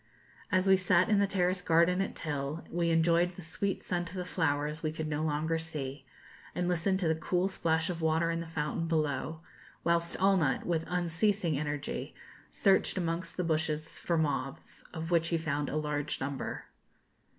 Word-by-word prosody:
As 185 -1 +3
we 190 -1 +6
sat 180 0 +3
in 210 -2 +4
the 200 - +3
terrace 185 -1 +1
garden 170 +2 +4
at 195 - -3
Til 145 +1 -3
we 170 -1 +1
enjoyed 170 +2 +3
the 185 - -8
sweet 195 +4 -2
scent 175 -1 -2
of 180 - -10
the 180 -1 -3
flowers 150 -3 0
we 155 - -1
could 160 0 -4
no 150 0 -1
longer 160 +1 0
see, 140 -4 -5 0.5
and 180 0 0
listened 180 +2 +1
to 170 - +1
the 160 - +4
cool 180 +4 0
splash 160 -4 +1
of 175 -2 -3
the 160 - -1
water 160 +1 +2
in 165 - -1
the 170 - -5
fountain 160 +1 -2
below; 155 0 -1 0.4
whilst 170 0 +1
Allnutt, 185 -7 +3
with 165 -2 0
unceasing 180 0 +1
energy, 145 -1 -3 0.4
searched 195 -1 +3
amongst 165 -1 -2
the 180 - 0
bushes 155 -1 -1
for 170 - 0
moths, 145 -3 -2
of 165 0 -5
which 165 -1 +3
he 170 - +1
found 150 -3 -1
a - - -3
large 150 -1 -1
number. 135 0 -4
165 Hz, 185 wpm, -31 LUFS, 155-180 Hz, 0.5 s, we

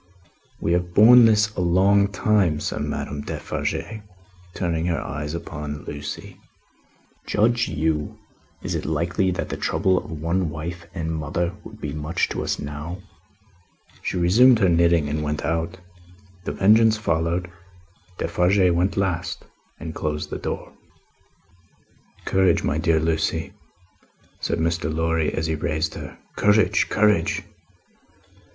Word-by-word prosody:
"We 85 - 0
have 90 0 -1
borne 120 +3 +8
this 110 -1 +3
a - - -3
long 95 +3 +4
time," 100 -6 +1
said - - -3
Madame 70 0 -3
Defarge, 110 +8 -4 0.5
turning 85 -2 -1
her 85 -2 0
eyes 75 +2 -4
again 85 - -6
upon 75 -1 -6
Lucie. 75 0 -7 0.9
"Judge 120 +3 +2
you! 80 -1 -1 0.5
Is - - -3
it - - -2
likely 85 +5 0
that 90 - -3
the - - -4
trouble 95 -1 +1
of - - -12
one 85 +3 -1
wife 85 +3 -6
and 80 -2 -3
mother 85 +3 -2
would 110 0 -12
be 75 -7 -4
much 75 +3 -1
to - - -3
us - - -1
now?" 75 +5 -6 1.0
She - - -2
resumed 115 +9 +6
her 95 -4 +3
knitting 85 -2 +3
and 75 +1 -2
went 75 0 -2
out. 85 +2 -2 0.7
The - - -2
Vengeance 110 +2 +5
followed. 85 -2 -1 0.7
Defarge 90 +2 +2
went 90 +4 0
last, 95 -4 -2 0.3
and 80 +2 -6
closed 75 -1 -3
the - - -4
door. - - -5 1.5
"Courage, 95 -1 +2
my 75 - 0
dear 80 -1 +2
Lucie," 80 0 -1 0.9
said - - -1
Mr. 85 0 -1
Lorry, 80 0 0
as 80 - -2
he 80 - 0
raised 80 +1 -1
her. - - -8 0.2
"Courage, 105 0 +3
courage! 105 -1 +2
85 Hz, 135 wpm, -23 LUFS, 80-95 Hz, 1.5 s, borne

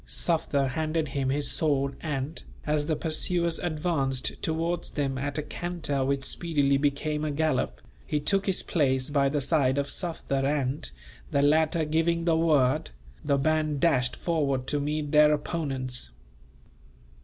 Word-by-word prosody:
Sufder 150 -5 +1
handed 155 +1 -1
him 135 -1 -1
his 145 +1 0
sword 140 -3 0
and, 150 0 -3 0.2
as 150 -1 0
the 160 - +1
pursuers 170 +2 0
advanced 150 -6 -1
towards 165 +2 -1
them 140 -2 -2
at 145 +1 -3
a 150 - -1
canter 165 -4 -3
which 135 0 0
speedily 145 -3 +1
became 150 +2 -1
a 155 - -1
gallop, 150 -1 0 0.2
he 150 - -1
took 195 +6 +1
his 190 - +2
place 130 -4 +1
by 140 -1 +3
the 145 +1 0
side 140 -2 +2
of 140 0 0
Sufder 160 -6 -1
and, 135 - -1 0.4
the 140 - +2
latter 155 +2 +3
giving 165 +2 +1
the 165 -2 +3
word, 155 -3 +2 0.3
the 140 -1 +2
band 155 0 +1
dashed 130 -6 +2
forward 140 -6 -1
to 145 +2 -1
meet 150 0 -2
their 150 0 +6
opponents. 135 - -2
150 Hz, 150 wpm, -27 LUFS, 140-160 Hz, 0.4 s, their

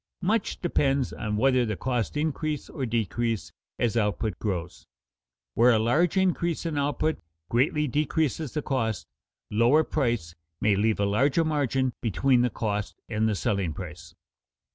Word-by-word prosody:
Much 210 +3 0
depends 140 -6 +1
on 105 -1 -3
whether 130 +1 +3
the 110 -3 -1
costs 125 +4 -2
increase 155 0 -2
or 135 -6 -3
decrease 115 0 -1 0.3
as 120 -1 0
output 110 -1 0
grows. 90 -5 -4 0.7
Where 120 +2 +5
a - - +4
large 150 - +2
increase 175 -3 +1
in 165 -2 -2
output 145 +2 0 0.3
greatly 150 +5 +2
decreases 150 +1 -1
the 150 - -1
cost, 110 - -1 0.5
lower 120 +9 +4
price 120 - -1 0.3
may 105 -2 +3
leave 110 +2 +1
a 100 - +2
larger 135 +10 +2
margin 135 -4 0
between 125 +3 +2
the 125 - +2
cost 105 -2 -3
and 110 -1 +1
the 105 - 0
selling 100 -6 -1
price. 85 -2 -9
120 Hz, 145 wpm, -27 LUFS, 105-150 Hz, 0.7 s, Where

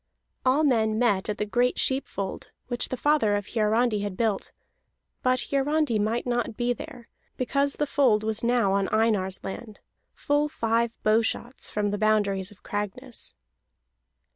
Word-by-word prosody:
All 265 +4 +3
men 220 -6 +2
met 210 -4 +2
at 210 - -2
the 210 - -1
great 245 +4 +1
sheep 265 +1 0
fold 195 -1 -5 0.2
which 245 -1 -1
the 255 - -3
father 290 -7 +3
of 205 -1 -3
Hiarandi 220 0 +2
had 200 -2 -4
built; 220 -4 0 0.7
but 255 0 +1
Hiarandi 280 -3 +1
might 220 +3 0
not 240 -3 -1
be 245 0 +1
there, 245 -1 -10 0.3
because 275 +3 +1
the 295 - 0
fold 250 -7 +3
was 220 0 -2
now 235 -5 +2
on 195 -1 +1
Einar's 210 -4 +1
land, 210 +2 -7 0.4
full 290 +1 +1
five 230 -3 0
bowshots 225 +3 0
from 205 -1 -1
the 205 - -2
boundaries 205 -3 +2
of 205 -2 -18
Cragness. 205 -1 -5
225 Hz, 155 wpm, -26 LUFS, 210-250 Hz, 0.7 s, All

